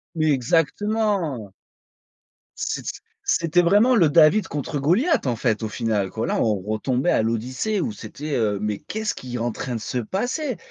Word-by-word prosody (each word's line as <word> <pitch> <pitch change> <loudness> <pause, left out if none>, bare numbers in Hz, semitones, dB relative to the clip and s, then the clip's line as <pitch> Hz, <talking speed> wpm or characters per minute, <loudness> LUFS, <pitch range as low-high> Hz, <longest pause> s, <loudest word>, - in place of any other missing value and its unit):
Mais 155 -1 +2
exactement! 165 - 0 1.1
C'ét - - -2
s - - -1 0.4
c'était 170 +1 +3
vraiment 205 +9 +4
le 175 -9 +5
David 165 +6 +5
contre 145 +1 -3
Goliath, 200 - +2
en 120 - 0
fait, 115 -1 0
au 110 - -1
final 110 -4 -1
quoi. 110 +4 -3
Là - - 0
on 105 -4 +1
retombait 125 - 0
à - - +3
l'Odyssée 130 - -1
où 225 - -2
c'était, 150 -6 -6
heu: 105 -3 +1
«Mais 105 -1 -1
qu'est-ce 220 0 -3
qui 125 -1 -8
est - - -1
en 120 0 -1
train 125 +2 -4
de 115 - -3
se 125 +3 -3
passer»? 245 - -2
145 Hz, 180 wpm, -23 LUFS, -, 1.1 s, le